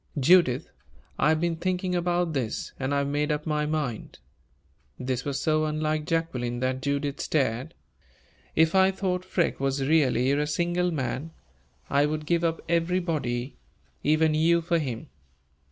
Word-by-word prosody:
"Judith, 145 -2 +4 0.5
I 150 - +4
have 160 0 +3
been 170 0 0
thinking 185 +1 -1
about 175 -1 0
this, 125 -6 -3
and 135 0 -2
I 140 - +2
have 140 0 0
made 145 +1 0
up 150 0 -2
my 150 -1 0
mind." 150 -8 -3 0.8
This 125 -1 -2
was 140 -2 -2
so 155 0 +1
unlike 155 0 -1
Jacqueline 130 -8 -1
that 130 0 -1
Judith 140 +1 -2
stared. 130 0 -1 0.8
"If 160 0 +4
I 190 0 +5
thought 185 -1 -2
Freke 185 -2 0
was 135 0 0
really 135 -5 +3
a 145 +1 +1
single 175 +3 0
man, 145 +1 -3 0.5
I 145 +1 +3
would 155 0 -3
give 170 +2 +1
up 165 -1 0
everybody 165 -7 -1 0.4
even 155 +1 +3
you 165 +2 +3
for 170 0 +1
him. 125 -7 -5
155 Hz, 155 wpm, -26 LUFS, 135-170 Hz, 0.8 s, I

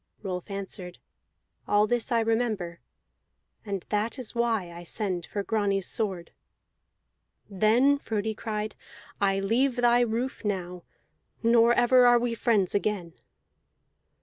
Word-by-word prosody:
Rolf 185 -1 -5
answered: 190 -2 -6 0.7
"All 205 0 +4
this 240 +3 -1
I 230 -1 +3
remember, 220 -7 -1 0.8
and 200 -4 -4
that 215 +5 -1
is 255 -4 -4
why 225 -7 0
I 170 0 -9
send 180 -1 -2
for 205 - -3
Grani's 200 -3 0
sword." 190 -6 -3 1.2
"Then," 225 +8 +3
Frodi 220 -3 -2
cried, 215 -1 -4 0.5
"I 195 -1 +2
leave 235 +6 +1
thy 240 -1 +4
roof 240 +2 -1
now, 180 -4 -4 0.6
nor 230 0 +5
ever 245 +1 +5
are 240 0 +6
we 240 0 -1
friends 220 -5 +1
again!" 200 -5 -1
215 Hz, 120 wpm, -27 LUFS, 195-235 Hz, 1.2 s, are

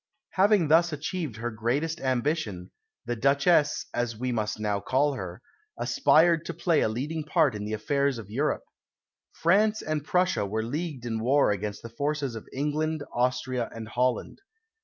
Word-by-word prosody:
Having 195 -4 +3
thus 170 +2 +5
achieved 155 - -4
her 120 +2 -4
greatest 135 +9 -1
ambition, 130 - -1 0.3
the 120 - -2
Duchesse 140 +6 +3
(as 120 -2 -2
we 125 +2 -2
must 110 -3 -2
now 105 -2 0
call 135 +8 +1
her) 90 -7 -7 0.3
aspired 170 - +4
to 170 - -5
play 165 -4 +2
a - - +2
leading 150 +8 -3
part 155 -3 +2
in 105 -1 -5
the 105 - -4
affairs 140 +5 0
of 110 -4 -8
Europe. 135 +9 -1 0.7
France 210 +6 +3
and 155 -2 -2
Prussia 180 - +1
were 110 +3 -2
leagued 145 +1 -4
in 115 -2 -2
war 130 +2 +3
against 105 +1 -4
the - - -6
forces 145 +1 -2
of 110 - -9
England, 150 +2 -1
Austria, 125 -1 0
and 110 -1 -7
Holland. 125 - -1
135 Hz, 160 wpm, -27 LUFS, 115-155 Hz, 0.7 s, thus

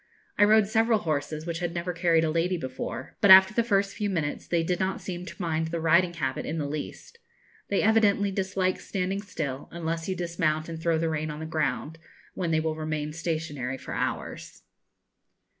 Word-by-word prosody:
I 205 - +6
rode 215 0 +5
several 225 +2 +3
horses 155 -3 -2
which 170 -1 -3
had 175 -1 -3
never 175 +1 -2
carried 170 -1 +3
a 160 - +1
lady 170 +3 +1
before; 130 -3 -6
but 200 - +5
after 190 +1 +9
the 235 - +3
first 200 -3 +1
few 205 -1 -1
minutes 160 -6 -2
they 170 -1 +1
did 175 +1 -1
not 190 0 -1
seem 180 -1 -6
to - - -10
mind 160 -3 -1
the 170 +1 -3
riding 170 +2 +3
habit 135 -5 -2
in 160 - -3
the 150 - -1
least. 150 - -6 0.5
They 200 - +1
evidently 205 -2 +3
dislike 190 -1 -1
standing 195 +1 -2
still, 145 -9 -5
unless 165 0 -3
you 190 - -1
dismount 165 -3 -1
and 165 -1 -6
throw 165 -1 +2
the 165 +1 0
rein 155 0 -2
on 150 0 -6
the 160 - -5
ground, 160 0 -2 0.3
when 175 -2 -2
they 160 -1 +2
will 155 0 -1
remain 155 -1 -3
stationary 155 -5 -3
for - - -8
hours. - - -4
170 Hz, 195 wpm, -27 LUFS, 155-190 Hz, 0.5 s, after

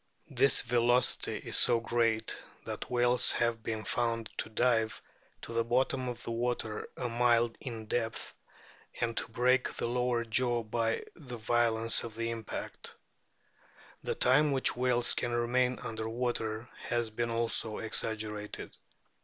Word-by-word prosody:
This 135 +1 +3
velocity 120 +1 +2
is - - -2
so 120 -1 +5
great 115 -1 +1 0.3
that - - -5
whales 120 0 +4
have 115 -1 0
been 110 0 -3
found 115 -2 -1
to - - -3
dive 110 -1 +1 0.4
to 115 - -7
the 115 0 +2
bottom 130 +2 +1
of 120 -1 -7
water 115 -2 -2
a 125 - -2
mile 120 0 +3
in 115 -5 -6
depth 115 0 -2 0.7
and 115 0 -1
to - - -1
break 125 +2 +3
the - - -2
lower 120 0 0
jaw 120 +1 +1
by 115 +1 -1
the 125 -7 -8
violence 115 0 +2
of 115 -2 -7
the 115 0 -2
impact. 115 -2 -6 1.1
The - - -2
time 150 +4 +4
which 135 -1 +2
whales 125 -1 +3
can 120 - -2
remain 125 +1 +1
under 110 0 -5
water 115 -1 -2 0.2
has 120 -2 0
been 115 +2 -2
also 115 -1 -1
exaggerated. 110 -1 -2
120 Hz, 140 wpm, -31 LUFS, 115-125 Hz, 1.1 s, so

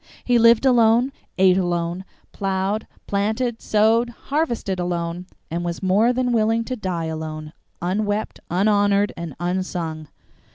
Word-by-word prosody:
He 245 -1 +3
lived 230 +2 +5
alone, 240 0 +4 0.3
ate 190 0 +5
alone, 175 0 -2 0.3
plowed, 195 +2 -2 0.2
planted, 220 +4 -1
sowed, 225 +3 +3
harvested 240 - -2
alone, 175 0 -3 0.2
and 170 +1 -2
was 175 +2 -4
more 205 +6 +3
than 250 -1 0
willing 225 0 +2
to 255 +2 -4
die 185 -7 -3
alone, 155 -1 -5 0.3
"unwept, 205 +3 -1
unhonored, 205 +2 +2
and 170 -5 -6
unsung." 175 -3 -3
200 Hz, 125 wpm, -22 LUFS, 175-225 Hz, 0.3 s, lived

